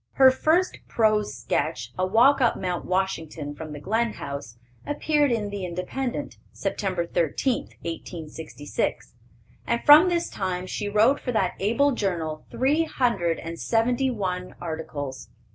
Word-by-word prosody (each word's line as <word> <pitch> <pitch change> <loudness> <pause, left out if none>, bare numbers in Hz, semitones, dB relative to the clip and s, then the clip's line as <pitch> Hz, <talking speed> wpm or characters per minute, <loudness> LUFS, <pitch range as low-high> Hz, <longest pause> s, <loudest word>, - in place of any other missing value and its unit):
Her 265 -1 +7
first 325 +7 +1
prose 215 -2 +2
sketch, 120 -1 -2
a 185 0 0
walk 245 +8 +5
up 235 - +3
Mt. 180 -2 -3
Washington 165 -6 -2
from 155 +1 -8
the 150 - -6
Glen 220 +7 0
House, 140 -5 -7 0.3
appeared 295 -1 +1
in 210 -3 -1
the 200 -2 -4
Independent, 180 +9 -4 0.2
Sept. 185 -4 -2
13, 175 - +1 0.2
1866; 155 -7 -4 0.5
and 235 0 0
from 305 +5 +9
this 345 -1 0
time 185 -2 -3
she 205 +2 -3
wrote 220 +7 +4
for 250 - -3
that 190 -5 +1
able 235 +9 +3
journal 170 - -2
three 295 +6 +2
hundred 195 - 0
and 165 0 -7
seventy 245 +3 +1
one 185 -6 -3
articles. 155 -5 -5
195 Hz, 140 wpm, -25 LUFS, 165-245 Hz, 0.5 s, from